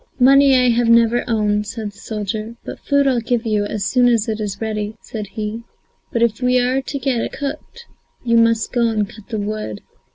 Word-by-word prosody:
"Money 275 +1 +6
I 250 -1 +4
have 235 0 +2
never 230 +1 +4
owned," 210 -2 0
said 220 -1 -5
the 200 - -19
soldier, 215 +1 -4
"but - - -7
food 280 -1 +1
I'll 260 -3 +2
give 235 0 -1
you, 210 -2 +1
as 205 -1 -3
soon 250 +2 +3
as 230 -3 +2
it 220 -1 -2
is 200 -2 -4
ready," 215 -1 -3
said 215 -2 -6
he, 210 +3 -5 0.5
"but 235 - +1
if 230 0 0
we 250 0 +3
are 255 +2 +1
to 275 +1 -5
get 255 -3 -1
it - - -4
cooked, 300 +11 -6 0.4
you 235 -1 +1
must 230 -1 +2
go 240 -2 +2
and 215 -2 0
cut 215 0 -14
the 220 - -3
wood." 205 - -4
230 Hz, 215 wpm, -19 LUFS, 210-245 Hz, 0.5 s, Money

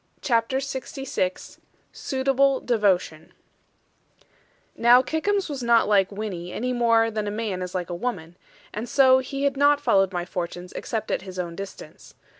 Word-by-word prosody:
CHAPTER 235 +1 +1
LXVI 270 -7 -4 0.3
SUITABLE 270 0 +1
DEVOTION 190 -8 0 1.4
Now 240 +2 +6
Kickums 395 +7 -1
was 285 -4 -5
not 235 -1 +3
like 200 -2 +3
Winnie, 195 -4 -5
any 250 +5 -2
more 230 -2 +3
than 215 -1 -3
a - - 0
man 205 -3 -3
is 180 0 -5
like 180 -1 -3
a - - -2
woman; 175 -5 -4 0.4
and 225 +3 -5
so 260 -1 +5
he 275 +1 -4
had 280 -1 +1
not 285 +1 +4
followed 200 -8 +2
my 175 -1 -3
fortunes, 175 0 -6
except 220 -2 -4
at - - -1
his 185 -1 -10
own 175 -2 -4
distance. 195 +1 -10
225 Hz, 155 wpm, -24 LUFS, 185-260 Hz, 1.4 s, Now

